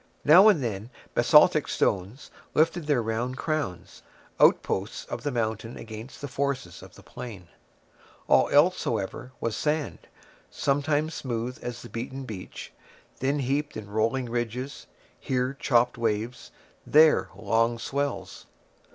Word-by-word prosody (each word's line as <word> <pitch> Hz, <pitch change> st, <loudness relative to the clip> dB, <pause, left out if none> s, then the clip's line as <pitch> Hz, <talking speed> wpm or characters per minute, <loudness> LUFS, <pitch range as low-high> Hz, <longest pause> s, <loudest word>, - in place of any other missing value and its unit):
Now 180 Hz, +8 st, +8 dB
and 170 Hz, -11 st, +4 dB
then 110 Hz, -1 st, -4 dB, 0.2 s
basaltic -, -, +5 dB
stones 100 Hz, +8 st, -1 dB, 0.2 s
lifted 165 Hz, 0 st, +2 dB
their 140 Hz, -6 st, +2 dB
round 120 Hz, +3 st, -2 dB
crowns, 155 Hz, -, -3 dB, 0.4 s
outposts -, -, +2 dB
of -, -, -6 dB
the 145 Hz, -, -2 dB
mountain 115 Hz, -2 st, -3 dB
against 110 Hz, +3 st, -9 dB
the 145 Hz, -, -4 dB
forces 140 Hz, -1 st, -3 dB
of -, -, -14 dB
the -, -, -15 dB
plain; 110 Hz, -8 st, -9 dB, 0.8 s
all -, -, +4 dB
else, 170 Hz, +6 st, +4 dB
however, 115 Hz, +3 st, -3 dB
was 115 Hz, -2 st, -2 dB
sand, 150 Hz, 0 st, -2 dB, 0.4 s
sometimes 145 Hz, +3 st, 0 dB
smooth 125 Hz, -1 st, -4 dB
as 120 Hz, -1 st, -6 dB
the -, -, -8 dB
beaten 130 Hz, +3 st, -5 dB
beach, 105 Hz, -7 st, -8 dB, 0.5 s
then 135 Hz, +3 st, 0 dB
heaped 140 Hz, +1 st, -1 dB
in 100 Hz, -2 st, -8 dB
rolling 115 Hz, +5 st, 0 dB
ridges; 120 Hz, +3 st, -4 dB, 0.3 s
here 130 Hz, +1 st, -1 dB
chopped 120 Hz, -2 st, +2 dB
waves, 115 Hz, +2 st, -2 dB, 0.3 s
there 155 Hz, -10 st, +5 dB
long 115 Hz, +3 st, +1 dB
swells. 140 Hz, +4 st, -4 dB
125 Hz, 130 wpm, -27 LUFS, 115-145 Hz, 0.8 s, Now